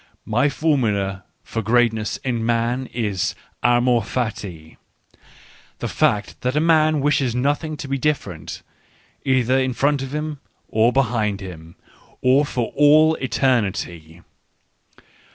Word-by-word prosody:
My 120 +6 +2
formula 105 - 0 0.2
for 115 - -4
greatness 110 -1 +1
in 120 -3 -1
man 120 +2 0
isl 105 -6 -2 0.3
amor 120 0 +3
fati: 100 -9 -5 1.0
the - - -4
fact 105 -1 0
that 125 +2 -1
a - - +3
man 155 -2 +3
wishes 135 -4 +1
nothing 145 +4 -1
to 145 - -6
be 135 0 -2
different, 100 - -3 0.6
either 130 -1 +2
in 130 -1 0
front 140 +2 +1
of 135 -1 -5
him 150 -1 -4 0.3
or 110 +2 +3
behind 110 -6 0
him, 85 -3 -10 0.4
or 135 +3 +4
for 120 -4 -3
all 155 +2 +6
eternity. 100 - -1
125 Hz, 120 wpm, -21 LUFS, 105-140 Hz, 1.0 s, all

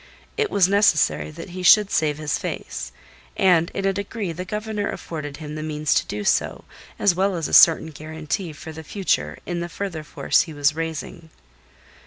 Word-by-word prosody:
It 440 -2 0
was 190 -3 +4
necessary 200 -7 +3
that 165 +4 -9
he 185 +1 -6
should 200 +3 +6
save 150 -2 +1
his 150 -2 -2
face, - - -5 0.5
and 175 -3 +4
in 195 - -4
a 195 - +2
degree 200 -1 -4
the 180 +3 -6
Governor 210 +1 -3
afforded 145 -3 -6
him 150 -1 -7
the 155 - -5
means 155 -1 -1
to - - +1
do 105 0 -4
so, - - 0 0.3
as 200 - +3
well 190 +2 +1
as 165 -4 -2
a - - -8
certain 160 -1 +7
guarantee 155 +4 -5
for 160 +2 -9
the 160 0 -9
future 195 +4 -1
in 175 -1 -3
the 170 0 -4
further 175 -3 -5
force - - +1
he 160 - -6
was 145 +1 +2
raising. 160 +1 -5
165 Hz, 190 wpm, -23 LUFS, 155-195 Hz, 0.5 s, certain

